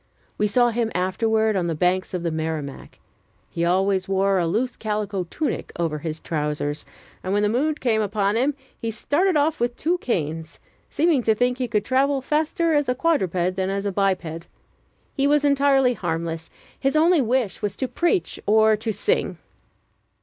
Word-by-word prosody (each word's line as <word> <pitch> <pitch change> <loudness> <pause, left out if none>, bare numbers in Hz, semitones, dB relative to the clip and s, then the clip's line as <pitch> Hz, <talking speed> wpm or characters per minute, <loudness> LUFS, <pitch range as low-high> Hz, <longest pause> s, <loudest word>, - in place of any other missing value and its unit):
We 210 - +1
saw 240 +4 +3
him 230 -1 -1
afterward 220 +4 +1
on 180 -3 0
the 165 - -1
banks 180 +3 0
of 175 - -3
the 170 - -1
Merrimack. 155 -3 -5 0.6
He 170 - -1
always 190 +2 +1
wore 195 0 +2
a 170 - +1
loose 235 +9 -1
calico 210 -3 -2
tunic 310 - -3
over 165 -3 -1
his 160 0 -4
trousers; 150 -1 -2 0.4
and, 185 - -2
when 205 +1 +2
the 210 - +2
mood 295 +7 0
came 225 -4 +1
upon 205 0 0
him, 265 +5 +1 0.3
he 230 - -2
started 310 - +1
off 305 +2 +1
with 240 0 0
two 350 +3 0
canes, 160 - -3 0.3
seeming 310 -3 +2
to 220 -2 +2
think 250 +2 0
he 250 - -1
could 210 -3 0
travel 270 +3 +2
faster 315 +4 0
as 290 -3 +2
a 250 - +1
quadruped 185 - +1
than 190 0 -1
as 200 +1 -2
a 200 - 0
biped. 180 -4 -1 0.7
He 275 -1 +1
was 295 0 +3
entirely 275 -2 +4
harmless; 165 -4 -3 0.3
his 270 +2 0
only 325 +1 +4
wish 240 -5 0
was 205 -1 -2
to 260 - -2
preach 350 +7 0
or 220 +1 +5
to 220 +1 -3
sing. 455 - -1
215 Hz, 180 wpm, -23 LUFS, 180-270 Hz, 0.7 s, or